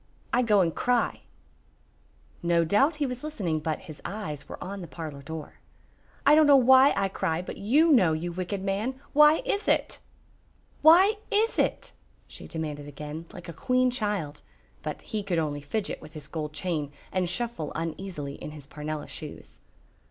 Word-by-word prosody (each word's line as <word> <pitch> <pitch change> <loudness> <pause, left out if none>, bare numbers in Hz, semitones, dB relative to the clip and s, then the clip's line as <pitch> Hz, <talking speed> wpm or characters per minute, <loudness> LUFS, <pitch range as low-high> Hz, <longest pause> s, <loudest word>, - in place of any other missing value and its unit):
I 245 - +4
go 210 -5 +4
and 165 -3 +1
cry." 245 -2 +1 1.2
No 170 -1 +2
doubt 275 - +3
he 300 -1 -1
was 250 0 -5
listening, 195 - -2
but 155 0 -3
his 155 -5 -11
eyes 155 -9 -6
were - - -6
on 195 +2 -6
the 175 - -7
parlor 155 -3 -7
door. 155 +1 -8 0.7
"I 285 - +7
don't 310 0 +6
know 285 - +8
why 260 +2 +7
I 195 0 +2
cry, 180 -3 -2
but - - -7
you 295 +11 +4
know, 195 - +5
you 170 +3 -3
wicked 185 +2 -4
man! 210 +7 -2
Why 300 - +6
is 415 -4 -1
it?" - - +1 0.8
"Why 375 +7 +7
is 440 +1 +1
it?" - - 0 0.4
she - - -10
demanded 150 -3 -5
again, 150 +3 -7
like 175 - -10
a 170 - -6
queen 255 +9 +2
child, 205 - -2 0.4
but - - -5
he 215 - -3
could 190 -4 -2
only 150 -3 -1
fidget 195 +9 -3
with 155 0 -12
his 155 -2 -8
gold 155 -2 -4
chain 150 -2 -3 0.2
and 185 -2 0
shuffle 230 -4 -3
uneasily 165 -2 -4
in 150 - -8
his 150 -2 -10
parnella 150 +1 -5
shoes. - - -9
185 Hz, 175 wpm, -27 LUFS, 155-250 Hz, 1.2 s, know